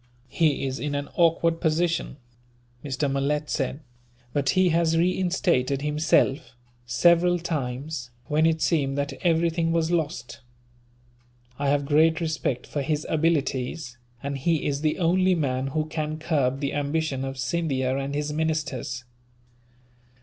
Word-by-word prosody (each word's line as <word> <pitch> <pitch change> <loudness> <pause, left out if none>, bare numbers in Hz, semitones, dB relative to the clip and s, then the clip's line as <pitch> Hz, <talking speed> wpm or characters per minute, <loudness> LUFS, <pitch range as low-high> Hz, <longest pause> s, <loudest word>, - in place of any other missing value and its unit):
"He 150 -1 +1
is 130 0 -3
in 145 -1 -2
an 145 0 -3
awkward 165 -1 +2
position," 165 -2 0 0.7
Mr. 145 0 -1
Malet 140 +2 -1
said, 135 +2 -2 0.5
"but 140 -2 +1
he 185 -1 +5
has 165 0 +2
reinstated 170 -6 +1
himself, 150 -1 +1 0.3
several 170 +7 +4
times, 140 -5 -4 0.2
when 155 +1 +2
it 160 -1 +1
seemed 140 -5 +1
that 140 0 -1
everything 165 -1 +2
was 165 0 +1
lost. 140 -8 -2 1.2
I 140 -1 +1
have 145 0 +1
great 155 +2 +4
respect 155 -6 -2
for 145 - -3
his 150 +1 -1
abilities, 145 -4 -1 0.2
and 140 0 -3
he 160 +2 +1
is 140 0 -1
the 155 -1 +1
only 185 +1 +3
man 135 -4 -1
who 155 +3 -1
can 155 0 -3
curb 140 -4 0
the 140 - -1
ambition 145 -1 -1
of 135 0 -4
Scindia 130 -3 -1
and 140 +1 -3
his 150 0 -2
ministers. 150 -5 -2
150 Hz, 135 wpm, -25 LUFS, 135-165 Hz, 1.2 s, he